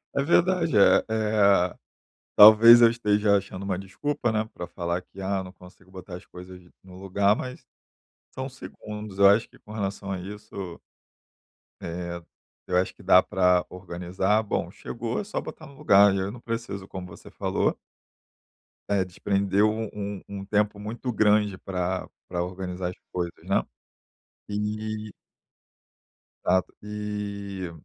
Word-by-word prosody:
É 140 - +2
verdade, 170 - +2
eh 100 - +6
eh, 105 -4 +3 0.6
talvez 115 +3 +10
eu 115 - +8
esteja 105 -3 +2
achando 100 -1 -4
uma 95 -2 -2
desculpa, 120 +6 -2
né, 110 0 0
pra 90 - -6
falar 85 +1 -3
que: 95 +2 -14
"Ah, 95 0 -1
não 90 - -10
consigo 95 0 -18
botar 95 -1 -9
as 90 - -13
coisas 90 0 -11 0.2
no 95 -1 -14
lugar." 100 +2 +2
Mas, 125 +1 -7 0.7
são 130 +1 -4
segundos, 105 -6 -9
eu 100 0 +8
acho 100 +3 +4
que - - -20
com 105 - -14
relação 100 -2 -4
a 95 - -3
isso 100 -2 -8 1.0
eh, 85 0 -5 0.4
eu - - 0
acho 90 +1 +1
que - - -17
dá 90 - +6
pra 90 -1 +2
organizar, 90 +3 -1
bom, 105 - -2
chegou, 115 0 -4
é - - -5
só 210 - -3
botar 155 - -9
no 140 - -14
lugar, 100 -8 +5
e - - 0
aí 95 - -1
eu 100 - -5
não 120 - -10
preciso, 115 -5 -5
como 95 -1 -7
você 85 - -13
falou - - -1 1.1
eh, 100 -2 +2
desprende 100 +2 -1
um 110 +1 +1
um 100 -1 -5
um 100 -1 -6
tempo 105 0 +1
muito 115 +4 -4
grande 105 -2 +2
pra 90 -1 -3 0.2
pra 85 - -2
organizar 90 0 -4
as 90 - -11 0.2
coisas, 85 -1 -2
né? - - +1 0.9
E 105 +1 -3 1.3
Exato, 95 +1 +1
e 100 -3 -5
100 Hz, 155 wpm, -26 LUFS, 95-110 Hz, 1.3 s, talvez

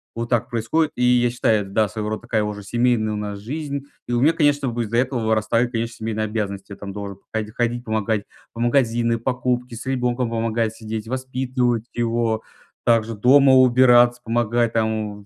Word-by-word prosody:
Вот 115 0 -4
так 120 -1 +1
происходит. 125 +7 0
И 125 - -1
я 125 -1 +3
считаю, 110 -3 +2
это, 95 - -11
да, 105 +1 +2
своего 105 -1 -4
рода 110 - -4
такая 115 -2 -1
уже 105 0 -4
семейная 115 +1 +1
у - - -3
нас 105 -1 -5
жизнь. 140 +4 -5 0.2
И - - -5
у 120 0 +1
меня, 155 +5 +5
конечно, 145 -3 +2
как 120 - -3
бы 120 - 0
из-за 115 +1 -2
этого 125 -2 0
вырастают, 110 +2 +1
конечно, 115 0 -3
семейные 110 -1 -3
обязанности. 100 -2 -4
Я - - -6
там 100 0 -8
должен 100 -1 -6 0.2
ходи 110 -1 -2
ходить 120 +1 -1
помогать 110 -2 -1 0.3
в 115 - -9
магазины, 120 -1 +2
покупки, 125 0 -2
с 120 +4 -8
ребенком 125 -2 0
помогать 115 -1 -1
сидеть, 110 0 -6
воспитывать 130 -2 -1
его, 115 -1 0 0.4
также 115 -1 +2
дома 135 +5 +5
убираться, 120 -1 +5
помогать 120 0 0
там 110 -2 -1
вот. 100 - -17
115 Hz, 195 wpm, -22 LUFS, 110-125 Hz, 0.4 s, меня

